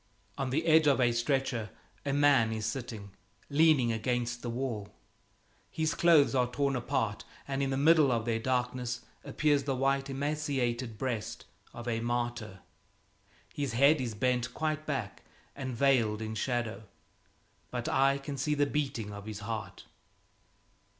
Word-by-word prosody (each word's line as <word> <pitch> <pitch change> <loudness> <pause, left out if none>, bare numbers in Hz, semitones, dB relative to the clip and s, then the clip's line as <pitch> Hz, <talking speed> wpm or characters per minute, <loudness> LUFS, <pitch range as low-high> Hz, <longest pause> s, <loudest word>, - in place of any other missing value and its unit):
On 135 -2 -2
the 155 +6 0
edge 160 -1 +5
of 140 -2 +4
a 120 -1 +4
stretcher 120 -2 0 0.3
a 140 - -1
man 140 -5 +4
is 110 -1 -3
sitting, 110 -4 -5 0.4
leaning 145 -5 +4
against 120 +1 -1
the 120 - -4
wall. 115 -4 -3 0.8
His 160 -1 -1
clothes 165 -5 +5
are 125 -2 +2
torn 140 +2 0
apart, 120 -4 -1 0.2
and 135 0 -2
in 135 - 0
the 135 - -1
middle 150 -1 +5
of 115 -2 0
their 115 -1 0
darkness 125 0 -1 0.2
appears 145 -3 +1
the 135 -2 0
white, 135 +1 +1
emaciated 135 -5 -2
breast 115 -3 -3 0.3
of 120 0 -9
a 115 -1 0
martyr. 120 -4 -3 0.9
His 140 -5 -2
head 140 +4 +5
is 115 -4 -3
bent 125 +2 0
quite 155 0 -2
back - - -3 0.3
and 130 -3 -4
veiled 120 -6 +3
in 110 0 -4
shadow, 115 -1 -2 0.8
but - - -4
I 135 +1 +3
can 140 0 -6
see 150 +3 0
the 145 0 +3
beating 135 -8 -2
of 100 +1 -9
his 105 -1 -6
heart. 110 -1 -5
125 Hz, 150 wpm, -30 LUFS, 115-140 Hz, 0.9 s, edge